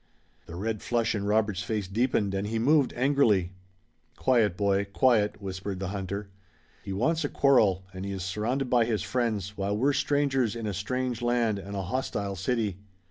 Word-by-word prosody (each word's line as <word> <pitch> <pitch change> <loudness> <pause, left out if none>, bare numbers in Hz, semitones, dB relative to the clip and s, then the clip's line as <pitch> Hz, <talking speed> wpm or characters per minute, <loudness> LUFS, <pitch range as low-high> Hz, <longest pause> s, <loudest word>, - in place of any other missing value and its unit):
The 85 - -8
red 110 +3 -3
flush 120 -2 0
in 100 -2 -2
Robert's 105 -2 +1
face 105 -1 -2
deepened 105 -1 0
and 100 +1 -2
he 115 +2 -2
moved 140 +4 +3
angrily. 120 -9 +3 0.7
"Quiet, 115 -8 +2
boy! 100 -1 +2
Quiet!" 105 0 +2
whispered 95 -1 -5
the 95 -1 -3
hunter. 100 0 -5 0.5
"He 100 - -7
wants 155 - +1
a 145 - -1
quarrel, 105 -9 +3
and 95 0 -6
he 100 - -4
is 95 -2 -4
surrounded 110 +8 -1
by 120 -2 +3
his 110 -5 -1
friends, 110 -5 -1
while 100 +1 -1
we're 140 +6 +2
strangers 135 -5 +1
in 115 -1 -5
a 105 - -2
strange 125 +5 -2
land 120 -4 +1
and 100 +1 -7
a 100 - -2
hostile 100 -2 -2
city. 100 0 -1
105 Hz, 180 wpm, -28 LUFS, 100-125 Hz, 0.7 s, moved